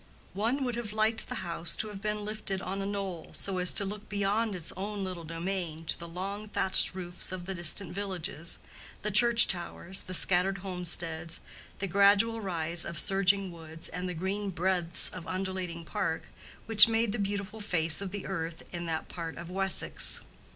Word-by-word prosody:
One 230 +8 -1
would 250 -2 -3
have 220 -3 -5
liked 220 +1 +1
the - - -4
house 170 0 -1
to 215 - -3
have 200 -2 -10
been 210 0 -3
lifted 215 -2 -4
on 195 +1 -5
a 195 - -4
knoll, 195 -4 -5
so 190 -2 -1
as 180 0 +5
to 200 - +3
look 205 +2 -8
beyond 205 +1 -1
its 170 -3 -4
own 200 +1 -5
little 185 -3 -6
domain 165 -1 -5
to - - -2
the 170 - -8
long 195 +5 -6
thatched 190 -2 +6
roofs 175 -1 -5
of 185 -1 -7
the 195 - -4
distant 175 +1 +1
villages, 180 -4 -3 0.5
the 210 - -1
church 235 +3 +6
towers, 185 +1 +1
the 185 - -5
scattered 190 +2 +4
homesteads, 170 -3 -1 0.4
the 195 - -3
gradual 200 +4 +3
rise 170 -3 0
of 170 - -5
surging 195 +1 +2
woods, 160 -1 -6
and 180 0 -5
the 180 - -5
green 195 +4 -4
breadths 180 -1 +3
of 180 -2 -10
undulating 185 -3 -5
park 195 -6 -3 0.4
which 225 -1 +9
made 225 -1 +1
the 220 - -4
beautiful 200 +2 -4
face 165 -4 +3
of 195 - -4
the 200 +1 -7
earth 165 -3 -5
in 175 -1 -5
that 160 -1 -4
part 165 -2 -7
of 170 +1 -9
Wessex. 190 0 +4
190 Hz, 185 wpm, -28 LUFS, 170-205 Hz, 0.5 s, which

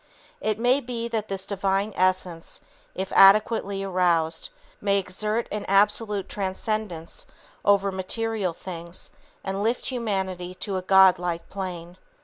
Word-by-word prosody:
It 215 -1 0
may 245 +4 +3
be 235 -3 -4
that 220 -2 -2
this 195 -1 -3
Divine 195 +1 -1
Essence, 185 -2 -1 0.3
if 190 +1 -4
adequately 200 0 +5
aroused, 175 - +1 0.3
may 200 -1 +2
exert 210 +4 -2
an 210 0 -3
absolute 205 +1 +2
transcendence 195 -3 -4 0.4
over 200 -1 +3
material 195 0 -2
things 170 0 -9 0.3
and 195 +1 -3
lift 230 +4 0
humanity 190 -7 -3
to 190 +1 -4
a 185 - -1
God 190 -1 +6
like 175 -1 -3
plane. 180 -2 -6
195 Hz, 125 wpm, -25 LUFS, 185-210 Hz, 0.4 s, God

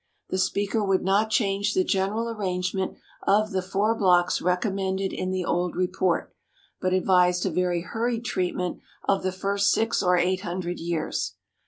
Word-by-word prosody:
The 185 - 0
speaker 205 +3 0
would 195 -2 +1
not 200 +4 +2
change 205 -1 +1
the 185 - +3
general 200 +5 0
arrangement 190 -3 -2 0.3
of 215 +2 +3
the 190 -1 0
four 195 +4 +1
blocks 180 -4 +3
recommended 190 +1 0
in 185 - -2
the 185 -1 -1
old 175 0 0
report, 180 -1 0 0.5
but 185 - 0
advised 180 -1 +3
a - - 0
very 180 -1 0
hurried 230 +5 -2
treatment 180 -5 -2 0.3
of 195 - +2
the 185 - -1
first 200 +2 +1
six 225 +1 +1
or 180 0 +3
eight 185 +1 +1
hundred 175 -1 -4
years. 165 -1 -2
190 Hz, 160 wpm, -26 LUFS, 180-200 Hz, 0.5 s, the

